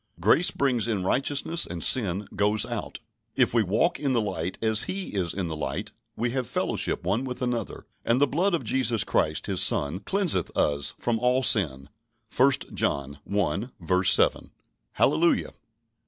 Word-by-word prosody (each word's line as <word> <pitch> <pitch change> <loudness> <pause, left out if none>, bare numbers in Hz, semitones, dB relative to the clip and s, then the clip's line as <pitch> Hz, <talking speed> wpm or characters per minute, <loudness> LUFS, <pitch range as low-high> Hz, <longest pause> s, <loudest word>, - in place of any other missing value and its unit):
Grace 110 - +3
brings 125 -5 -1
in 105 -5 -2
righteousness 145 - 0
and 85 -2 -5
sin 100 -5 +3
goes 105 +1 +2
out. - - -6 0.4
"If - - +4
we 115 - +3
walk 110 - 0
in 140 -3 -1
the 120 - +2
light, 95 -4 -4
as 110 -1 +1
He 195 0 -4
is 90 -4 -1
in 95 -3 -3
the 80 - -5
light, 75 - -5 0.2
we 120 +2 -2
have 130 -1 -3
fellowship - - -1
one 100 +8 -1
with 125 -1 -6
another, 120 -4 -4 0.2
and 115 +2 +1
the 145 - +4
blood 175 +7 0
of 165 - -4
Jesus 125 -6 +1
Christ 75 -4 -1
His 95 -3 -1
Son 75 +6 +3
cleanseth 185 - 0
us 70 -1 0
from 115 -2 -2
all 125 +2 +1
sin" 70 - +2 0.5
(1 135 +2 +4 0.2
John 70 +1 -2
i. 95 -1 -1
7). 95 - +4 0.4
Hallelujah! 170 +1 +1
110 Hz, 165 wpm, -25 LUFS, 90-130 Hz, 0.5 s, If